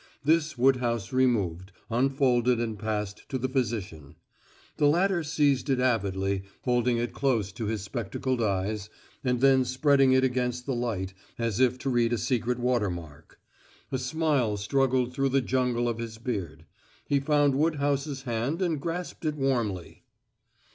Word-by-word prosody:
This 155 Hz, -1 st, +2 dB
Woodhouse 120 Hz, -3 st, +1 dB
removed, 100 Hz, -8 st, +1 dB, 0.2 s
unfolded 125 Hz, -1 st, +2 dB
and 110 Hz, -3 st, -3 dB
passed 105 Hz, -1 st, -4 dB
to 130 Hz, -, -1 dB
the 130 Hz, +1 st, -1 dB
physician. 110 Hz, -, -3 dB, 0.6 s
The 145 Hz, -, +4 dB
latter 175 Hz, +4 st, +2 dB
seized 145 Hz, -3 st, +1 dB
it 130 Hz, -2 st, +2 dB
avidly, 100 Hz, -6 st, 0 dB, 0.2 s
holding 120 Hz, -1 st, +2 dB
it 120 Hz, 0 st, -2 dB
close 115 Hz, -8 st, 0 dB
to 110 Hz, +3 st, -5 dB
his 105 Hz, -3 st, -2 dB
spectacled 120 Hz, +3 st, -3 dB
eyes, 100 Hz, 0 st, -1 dB, 0.3 s
and 125 Hz, -2 st, 0 dB
then 135 Hz, -1 st, +5 dB
spreading 135 Hz, +1 st, +3 dB
it 130 Hz, 0 st, +4 dB
against 125 Hz, -1 st, -1 dB
the 135 Hz, -, -1 dB
light 110 Hz, -6 st, -2 dB, 0.2 s
as 115 Hz, -2 st, -1 dB
if 130 Hz, -1 st, +3 dB
to 135 Hz, +1 st, -2 dB
read 120 Hz, -1 st, +2 dB
a -, -, +1 dB
secret 125 Hz, 0 st, 0 dB
water 120 Hz, -4 st, +1 dB
mark. 80 Hz, -3 st, -9 dB, 0.5 s
A 130 Hz, -, -1 dB
smile 130 Hz, -5 st, 0 dB
struggled 130 Hz, +3 st, +1 dB
through 135 Hz, 0 st, +1 dB
the 135 Hz, +1 st, +3 dB
jungle 125 Hz, -1 st, 0 dB
of 115 Hz, -1 st, -2 dB
his 115 Hz, -1 st, -6 dB
beard. 90 Hz, -10 st, -4 dB, 0.4 s
He 140 Hz, -, +2 dB
found 145 Hz, 0 st, +3 dB
Woodhouse's 145 Hz, -2 st, 0 dB
hand 120 Hz, +6 st, -2 dB
and 165 Hz, -6 st, 0 dB
grasped 175 Hz, +2 st, -4 dB
it 155 Hz, -2 st, -1 dB
warmly. 120 Hz, -, -2 dB
125 Hz, 155 wpm, -27 LUFS, 110-135 Hz, 0.6 s, then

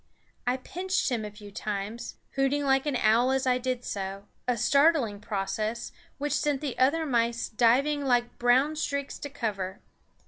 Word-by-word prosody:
I 250 Hz, +1 st, +2 dB
pinched 365 Hz, +4 st, -1 dB
him 230 Hz, -3 st, 0 dB
a 210 Hz, -, -4 dB
few 205 Hz, 0 st, -12 dB
times, 210 Hz, +2 st, -4 dB, 0.2 s
hooting 270 Hz, +2 st, +1 dB
like 270 Hz, +1 st, +2 dB
an 285 Hz, -, 0 dB
owl 235 Hz, +2 st, +4 dB
as 265 Hz, 0 st, +1 dB
I 250 Hz, -1 st, +3 dB
did 255 Hz, -1 st, -2 dB
so, 195 Hz, 0 st, -4 dB, 0.2 s
a 245 Hz, -1 st, +1 dB
startling 280 Hz, -3 st, +3 dB
process, 215 Hz, +3 st, -3 dB, 0.3 s
which 290 Hz, +1 st, -1 dB
sent 290 Hz, -2 st, +1 dB
the 280 Hz, -3 st, -3 dB
other 300 Hz, +5 st, +3 dB
mice 235 Hz, -3 st, +1 dB
diving 265 Hz, +6 st, +3 dB
like 245 Hz, -2 st, +1 dB
brown 255 Hz, +5 st, +4 dB
streaks 280 Hz, -2 st, -3 dB
to 285 Hz, -, -5 dB
cover. 205 Hz, -9 st, -3 dB
250 Hz, 165 wpm, -28 LUFS, 220-280 Hz, 0.3 s, owl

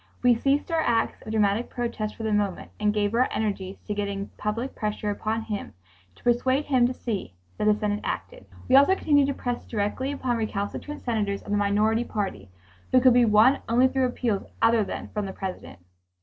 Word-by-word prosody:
We 245 Hz, -1 st, +6 dB
ceased 275 Hz, +7 st, 0 dB
our 325 Hz, -1 st, +2 dB
acts 235 Hz, -6 st, 0 dB
of 215 Hz, -, -7 dB
dramatic 210 Hz, +1 st, +1 dB
protest 230 Hz, -3 st, -3 dB
for 225 Hz, -, -7 dB
the 220 Hz, -1 st, 0 dB
moment 205 Hz, -3 st, -1 dB
and 210 Hz, 0 st, +2 dB
gave 210 Hz, 0 st, 0 dB
our 250 Hz, +2 st, +3 dB
energies 200 Hz, -3 st, -2 dB
to 210 Hz, -, -4 dB
getting 200 Hz, -1 st, -3 dB
public 230 Hz, +5 st, -3 dB
pressure 210 Hz, -1 st, -2 dB
upon 220 Hz, +2 st, -2 dB
him, 210 Hz, -3 st, -5 dB, 0.4 s
to -, -, -22 dB
persuade 260 Hz, +4 st, +2 dB
him 255 Hz, -4 st, +3 dB
to 255 Hz, -, -3 dB
see 195 Hz, -, -4 dB, 0.2 s
that -, -, 0 dB
the 210 Hz, 0 st, +5 dB
Senate 210 Hz, -1 st, -1 dB
acted. -, -, -5 dB, 0.2 s
We 255 Hz, -, +4 dB
also 280 Hz, +8 st, +6 dB
continued 285 Hz, -6 st, +3 dB
to 280 Hz, -, -1 dB
press 245 Hz, -1 st, -3 dB
directly 225 Hz, +5 st, -2 dB
upon 260 Hz, -4 st, -1 dB
recalcitrant 220 Hz, +7 st, -4 dB
senators 210 Hz, -4 st, -1 dB
of -, -, -8 dB
the 205 Hz, -, +2 dB
minority 210 Hz, +3 st, +2 dB
party 200 Hz, -, -4 dB, 0.4 s
who 255 Hz, -, +6 dB
could 255 Hz, -1 st, +6 dB
be 245 Hz, 0 st, +5 dB
won 220 Hz, +5 st, +5 dB
only 245 Hz, +3 st, +5 dB
through 260 Hz, 0 st, +1 dB
appeals 235 Hz, -5 st, -1 dB, 0.2 s
other 225 Hz, -1 st, +4 dB
than -, -, -6 dB
from 210 Hz, -2 st, -3 dB
the 190 Hz, -, -6 dB
President. 190 Hz, -1 st, -6 dB
220 Hz, 200 wpm, -26 LUFS, 205-250 Hz, 0.4 s, We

